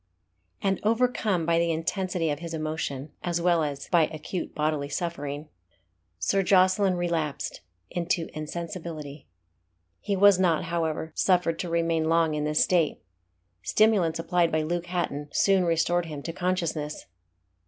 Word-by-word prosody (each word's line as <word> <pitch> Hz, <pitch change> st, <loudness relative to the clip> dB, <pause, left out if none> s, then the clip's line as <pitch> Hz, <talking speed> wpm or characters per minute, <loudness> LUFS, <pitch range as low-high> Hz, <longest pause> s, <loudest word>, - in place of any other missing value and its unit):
And 195 Hz, -1 st, +1 dB
overcome 220 Hz, -5 st, +1 dB
by 165 Hz, 0 st, +3 dB
the 170 Hz, 0 st, +2 dB
intensity 165 Hz, 0 st, -1 dB
of 145 Hz, -, -3 dB
his 165 Hz, -1 st, -5 dB
emotion, 155 Hz, -2 st, -3 dB
as 175 Hz, -1 st, -1 dB
well 170 Hz, -1 st, +3 dB
as 145 Hz, -2 st, -3 dB
by 165 Hz, -3 st, +4 dB
acute 160 Hz, +3 st, -5 dB
bodily 150 Hz, -2 st, -1 dB
suffering, 145 Hz, -2 st, -4 dB, 0.7 s
Sir 195 Hz, -, +1 dB
Jocelyn 190 Hz, 0 st, +4 dB
relapsed 165 Hz, -5 st, -2 dB, 0.3 s
into 170 Hz, -1 st, -1 dB
insensibility. 155 Hz, -2 st, -6 dB, 0.7 s
He 200 Hz, -, -1 dB
was 200 Hz, -1 st, +6 dB
not, 170 Hz, -4 st, +2 dB
however, 160 Hz, -1 st, -2 dB
suffered 175 Hz, -3 st, +2 dB
to 180 Hz, -, -3 dB
remain 165 Hz, -1 st, +1 dB
long 165 Hz, -1 st, +3 dB
in 150 Hz, 0 st, -1 dB
this 150 Hz, 0 st, +3 dB
state. 170 Hz, -4 st, +1 dB, 0.6 s
Stimulants 190 Hz, -, +3 dB
applied 170 Hz, 0 st, +1 dB
by 155 Hz, 0 st, +1 dB
Luke 175 Hz, +2 st, -2 dB
Hatton 160 Hz, -5 st, -2 dB
soon 195 Hz, -2 st, +3 dB
restored 170 Hz, +1 st, +1 dB
him 150 Hz, -3 st, -7 dB
to 165 Hz, -, -4 dB
consciousness. 165 Hz, -5 st, -2 dB
165 Hz, 140 wpm, -27 LUFS, 155-180 Hz, 0.7 s, was